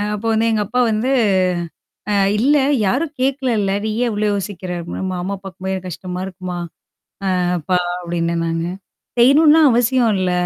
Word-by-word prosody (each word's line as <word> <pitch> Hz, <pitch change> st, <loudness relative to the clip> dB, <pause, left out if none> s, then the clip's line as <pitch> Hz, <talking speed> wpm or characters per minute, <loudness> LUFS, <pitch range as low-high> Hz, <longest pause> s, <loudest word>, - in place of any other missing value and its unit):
அப்போ 225 Hz, +2 st, -4 dB
வந்து 220 Hz, +1 st, +2 dB
எங்க 215 Hz, -1 st, +1 dB
அப்பா 250 Hz, +2 st, -1 dB
வந்து. 230 Hz, +5 st, 0 dB, 1.0 s
அ -, -, +1 dB, 0.2 s
"இல்ல 280 Hz, +7 st, +3 dB, 0.3 s
யாரும் 290 Hz, +10 st, 0 dB
கேக்கல 265 Hz, 0 st, 0 dB
இல்ல! 195 Hz, -1 st, 0 dB
நீயேன் 230 Hz, +3 st, 0 dB
இவ்ளோ 210 Hz, 0 st, 0 dB
யோசிக்கிற?" 195 Hz, -2 st, -4 dB
அப்படினா 170 Hz, -, -6 dB
மாமா 185 Hz, +3 st, -3 dB
பாக்கும்போது 190 Hz, 0 st, -5 dB
ரொம்ப 185 Hz, -, -10 dB
கஷ்டமா 180 Hz, +1 st, -6 dB
இருக்கும்மா? 185 Hz, -1 st, -6 dB, 0.8 s
அ -, -, 0 dB, 0.2 s
அப்பா 180 Hz, +3 st, 0 dB, 0.2 s
அப்டின்னேன் 170 Hz, -1 st, -1 dB
நானு. 165 Hz, +1 st, -2 dB, 0.5 s
"செய்யணும்ன்லாம் 295 Hz, +4 st, +6 dB
அவசியம் 240 Hz, 0 st, +2 dB
இல்ல. 185 Hz, -1 st, 0 dB
205 Hz, 150 wpm, -19 LUFS, 180-250 Hz, 1.0 s, செய்யணும்ன்லாம்